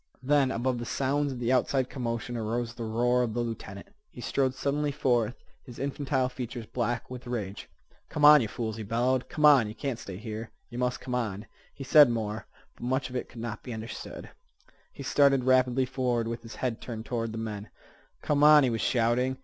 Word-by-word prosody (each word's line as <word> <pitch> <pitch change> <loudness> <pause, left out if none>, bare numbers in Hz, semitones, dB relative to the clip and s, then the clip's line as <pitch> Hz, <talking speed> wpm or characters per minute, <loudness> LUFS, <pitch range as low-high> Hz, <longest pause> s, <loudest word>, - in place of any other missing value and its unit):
Then, 140 0 +3
above 125 0 -1
the - - -4
sounds 140 +3 0
of 130 - -5
the 120 0 -1
outside 130 0 +2
commotion, 120 -2 -4
arose 115 +1 -2
the 115 -1 -6
roar 120 +3 +2
of 115 -2 -1
the 120 - 0
lieutenant. 110 -4 -6 0.2
He - - -13
strode 130 +1 0
suddenly 145 +2 -1
forth, 125 -5 +1 0.3
his 125 -3 -12
infantile 135 -1 -1
features 125 -2 -6
black 120 +1 -2
with 125 -1 -8
rage. 105 -5 -5 0.4
"Come 150 -1 +2
on, 150 -1 +9
yeh 115 - -1
fools!" 110 0 -4
he - - -5
bellowed. 120 +4 0
"Come 150 - +1
on! 140 -7 +7
Yeh 105 - -6
can't 135 -5 -3
stay 95 -2 -7
here. 110 +1 -6 0.2
Yeh 120 - -7
must 125 0 -1
come 125 - -5
on." 110 -4 -2 0.3
He 135 - -9
said 145 0 +7
more, 110 -2 -3 0.3
but - - -20
much 130 +1 -1
of - - -8
it 125 - -3
could 120 - -9
not 115 -2 -5
be 125 - -7
understood. 110 +1 -8 0.6
He - - -9
started 140 -2 +4
rapidly 130 0 +3
forward, 125 -3 -1
with 115 0 -4
his 115 0 -10
head 125 -3 -3
turned 115 -2 -6
toward 115 -2 -2
the 110 - -6
men, 105 -2 -5 0.5
"Come 145 -1 +2
on," 150 -1 +8
he 125 - +2
was 115 - -2
shouting. 125 +2 +1
125 Hz, 205 wpm, -28 LUFS, 115-130 Hz, 0.6 s, on